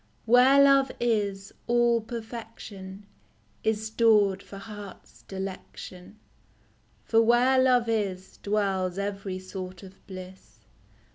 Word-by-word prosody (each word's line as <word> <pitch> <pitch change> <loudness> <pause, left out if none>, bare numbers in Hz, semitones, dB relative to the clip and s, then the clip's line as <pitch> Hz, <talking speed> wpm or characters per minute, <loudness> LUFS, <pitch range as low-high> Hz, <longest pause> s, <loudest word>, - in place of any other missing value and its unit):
Where 250 +4 +6
love 275 -1 +5
is, 205 -4 -1
all 240 -1 +3
perfection 220 -4 -8 0.6
Is 220 0 0
stored 215 -3 +3
for 200 - -11
heart's 205 -2 -11
delection; 190 0 -8 0.9
For 225 0 +3
where 245 +3 +4
love 250 -2 +3
is 195 -4 -2
Dwells 195 -3 -1
every 195 -1 -4
sort 185 0 -8
of 190 0 -14
bliss. 185 - -11
210 Hz, 100 wpm, -27 LUFS, 190-230 Hz, 0.9 s, Where